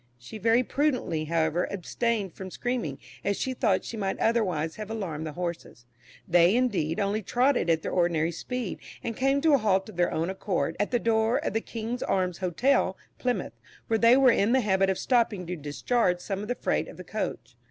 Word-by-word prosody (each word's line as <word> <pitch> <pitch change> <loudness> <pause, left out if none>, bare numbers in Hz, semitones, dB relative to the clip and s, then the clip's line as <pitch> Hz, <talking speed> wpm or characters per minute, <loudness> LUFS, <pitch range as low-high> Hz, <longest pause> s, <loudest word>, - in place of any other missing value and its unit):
She 120 - -10
very 230 +4 +3
prudently, 250 - 0
however, 165 +1 +1
abstained 200 +1 -2
from 190 -1 -8
screaming, 235 - -3 0.3
as 200 - 0
she 260 - -2
thought 215 -7 +1
she - - -5
might 195 -2 -2
otherwise 180 -9 0
have 215 -1 -6
alarmed 170 -8 -4
the 155 - -6
horses. 170 -8 -5 0.4
They, 175 +3 +5
indeed, 205 -11 0
only 205 +2 0
trotted 245 -1 +1
at 160 -1 +2
their - - -3
ordinary 170 -2 +1
speed, 245 +5 -4 0.2
and 230 - -3
came 270 +3 +2
to 315 -1 +4
a 280 - +5
halt 195 -2 +1
of 200 - -12
their 175 - +2
own 165 +3 -1
accord 175 -5 -2
at 205 - +1
the 245 - +2
door 225 0 +2
of - - -1
the 225 - 0
"King's 230 +2 -5
Arms" 185 -2 0
Hotel, 190 +3 +1 0.2
Plymouth, 250 -1 -1 0.3
where 225 -1 +1
they 235 +3 +6
were 265 -2 +6
in 220 +1 +2
the 265 - +4
habit 195 -3 +2
of 190 - 0
stopping 230 -7 +1
to 180 +1 -4
discharge 175 - 0
some 195 +2 -4
of 210 - -6
the 245 - -1
freight - - -1
of - - -11
the - - -8
coach. - - -5
200 Hz, 205 wpm, -27 LUFS, 175-235 Hz, 0.4 s, they